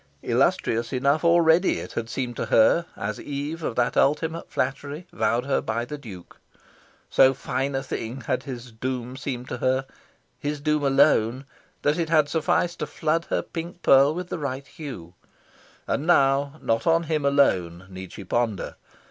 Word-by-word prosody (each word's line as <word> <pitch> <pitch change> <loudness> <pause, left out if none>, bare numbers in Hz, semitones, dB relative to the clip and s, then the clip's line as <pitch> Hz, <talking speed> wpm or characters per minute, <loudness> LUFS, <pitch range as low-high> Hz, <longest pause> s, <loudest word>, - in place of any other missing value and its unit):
Illustrious 115 +1 +1
enough 140 +4 +1
already 170 +1 +4
it - - -7
had 115 -1 -4
seemed 120 0 -3
to - - -3
her, 170 +10 +4
as 105 +1 -4
eve 145 +3 -4
of 125 - -3
that 120 -1 +1
ultimate 160 +4 +1
flattery 145 +5 -3
vowed 115 +3 0
her 140 - +1
by 115 +2 -2
the 150 - -6
Duke. 105 -11 -12 0.7
So 130 0 +5
fine 135 +1 -2
a 135 - -1
thing 130 -1 -5
had 110 - -1
his 125 -3 -8
doom 125 +2 -4
seemed 130 -2 -5
to - - -3
her 130 +2 +1 0.5
his 145 0 -3
doom 150 0 0
alone 130 -2 +3 0.4
that 150 +4 +2
it 165 -2 -1
had 155 -3 +3
sufficed 165 +3 0
to - - -2
flood 165 +1 -1
her - - -1
pink 170 +1 -7
pearl 140 +3 +6
with 180 0 -5
the 175 - -4
right 140 -2 -4
hue. 120 - -9 0.7
And 145 +4 -2
now 140 -3 +3
not 115 +5 0
on 165 0 +4
him 155 -2 -1
alone 95 -12 +2
need 95 -1 -9
she 100 - -9
ponder. 110 +1 -2
135 Hz, 170 wpm, -25 LUFS, 120-155 Hz, 0.7 s, pearl